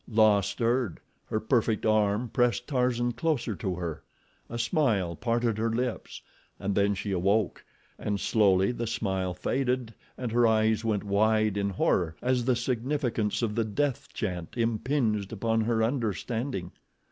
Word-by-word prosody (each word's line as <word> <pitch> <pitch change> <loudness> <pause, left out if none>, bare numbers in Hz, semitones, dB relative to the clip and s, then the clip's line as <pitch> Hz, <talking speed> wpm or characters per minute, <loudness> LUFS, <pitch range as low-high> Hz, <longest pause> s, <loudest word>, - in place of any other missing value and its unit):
La 110 -2 +4
stirred. 115 +1 -1 0.3
Her 110 - -1
perfect 110 -1 +1
arm 110 +2 +2
pressed 120 +1 +1
Tarzan 125 -3 +1
closer 130 -5 -1
to 95 -4 -2
her—a 85 +6 -8
smile 115 - +1
parted 115 +1 0
her 115 +1 +1
lips 120 +1 -3 0.4
and 100 +1 -1
then 100 +1 +2
she 100 +1 -4
awoke, 95 +3 +1 0.4
and 100 -1 -2
slowly 100 -2 +3
the 120 -1 -3
smile 95 -4 -1
faded 125 +3 -1 0.2
and 125 -3 -3
her 120 0 +4
eyes 110 0 +2
went 110 -3 0
wide 110 +1 +2
in 100 0 0
horror 90 -3 +1
as 125 -1 0
the 130 -1 +3
significance 120 -3 -1
of 110 -2 0
the 115 +1 +1
death 130 +5 -1
chant 90 -1 -4
impinged 115 -2 0
upon 115 +1 0
her 110 0 +1
understanding. 115 -3 -2
110 Hz, 145 wpm, -28 LUFS, 100-120 Hz, 0.4 s, La